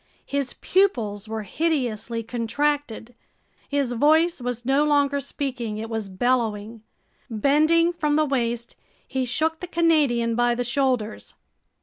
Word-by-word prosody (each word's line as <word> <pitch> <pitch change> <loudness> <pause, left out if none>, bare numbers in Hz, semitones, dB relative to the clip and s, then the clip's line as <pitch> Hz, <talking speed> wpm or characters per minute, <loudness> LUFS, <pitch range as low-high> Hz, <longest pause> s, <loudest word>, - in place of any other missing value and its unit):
His 280 -2 -2
pupils 225 - +1
were 220 -1 -3
hideously 235 - -2
contracted. 245 +1 -2 0.6
His 280 -3 0
voice 315 +5 +3
was 245 -1 -4
no 270 +3 +3
longer 285 -1 +2
speaking, 250 -5 -4
it 225 +1 -6
was 220 -3 -3
bellowing. 225 0 -1 0.5
Bending 310 +9 +3
from 300 -3 0
the 310 0 +3
waist, 240 -4 -2 0.3
he 260 -1 -1
shook 315 +6 0
the 360 - -6
Canadian 300 -9 +2
by 240 0 +2
the 245 - -1
shoulders. 250 -3 -1
255 Hz, 125 wpm, -24 LUFS, 230-295 Hz, 0.6 s, voice